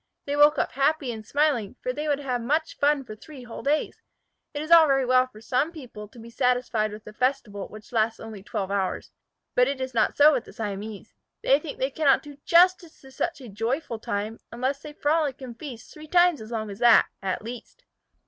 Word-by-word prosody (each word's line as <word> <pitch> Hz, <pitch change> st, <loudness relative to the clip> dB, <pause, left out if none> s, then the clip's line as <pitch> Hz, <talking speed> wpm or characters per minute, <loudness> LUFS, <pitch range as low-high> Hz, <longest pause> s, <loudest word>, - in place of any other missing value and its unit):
They 285 Hz, -, -2 dB
woke 295 Hz, +1 st, +6 dB
up -, -, 0 dB
happy 275 Hz, -1 st, +1 dB
and 220 Hz, -2 st, -7 dB
smiling, 270 Hz, -4 st, 0 dB
for 250 Hz, -, -1 dB
they 300 Hz, +3 st, -4 dB
would 290 Hz, -2 st, +2 dB
have 250 Hz, -3 st, -2 dB
much 305 Hz, +7 st, -1 dB
fun 290 Hz, -1 st, +2 dB
for 215 Hz, -4 st, -9 dB
three 265 Hz, +4 st, -12 dB
whole 240 Hz, -2 st, -8 dB
days. 295 Hz, +2 st, -1 dB, 0.5 s
It 290 Hz, -1 st, -4 dB
is 310 Hz, -, -7 dB
all 330 Hz, -2 st, +9 dB
very 270 Hz, -2 st, +2 dB
well 255 Hz, 0 st, +4 dB
for 215 Hz, -4 st, -15 dB
some 260 Hz, +7 st, 0 dB
people 245 Hz, -10 st, -10 dB
to 215 Hz, -, -19 dB
be 230 Hz, 0 st, -11 dB
satisfied 245 Hz, -4 st, 0 dB
with 210 Hz, 0 st, -10 dB
a 215 Hz, -, -10 dB
festival 240 Hz, -5 st, -1 dB
which 215 Hz, 0 st, -13 dB
lasts 225 Hz, -1 st, +1 dB
only 220 Hz, -3 st, -9 dB
twelve 195 Hz, -1 st, -4 dB
hours, 195 Hz, -2 st, -2 dB, 0.4 s
but 250 Hz, 0 st, +4 dB
it 275 Hz, -1 st, -2 dB
is 260 Hz, -1 st, -4 dB
not 230 Hz, -, +1 dB
so 300 Hz, +1 st, +7 dB
with 240 Hz, -, -1 dB
the -, -, -13 dB
Siamese. 210 Hz, 0 st, -6 dB, 0.3 s
They 275 Hz, +2 st, +4 dB
think 300 Hz, -1 st, -8 dB
they 265 Hz, +2 st, -1 dB
cannot 285 Hz, -1 st, +3 dB
do 290 Hz, -1 st, -11 dB
justice 345 Hz, -1 st, +4 dB
to 265 Hz, -, -15 dB
such 295 Hz, +3 st, -3 dB
a 250 Hz, -, -9 dB
joyful 230 Hz, +4 st, -3 dB
time 215 Hz, +1 st, -4 dB
unless 260 Hz, +4 st, -2 dB
they 300 Hz, -, -9 dB
frolic 295 Hz, -2 st, 0 dB
and 255 Hz, -3 st, -8 dB
feast 255 Hz, -7 st, -9 dB
three 310 Hz, 0 st, -12 dB
times 350 Hz, -2 st, +4 dB
as 220 Hz, -, -9 dB
long 220 Hz, -3 st, -4 dB
as 200 Hz, -, -9 dB
that, 235 Hz, -1 st, +6 dB, 0.2 s
at 195 Hz, +1 st, -3 dB
least. 245 Hz, -, -9 dB
255 Hz, 220 wpm, -25 LUFS, 225-295 Hz, 0.5 s, all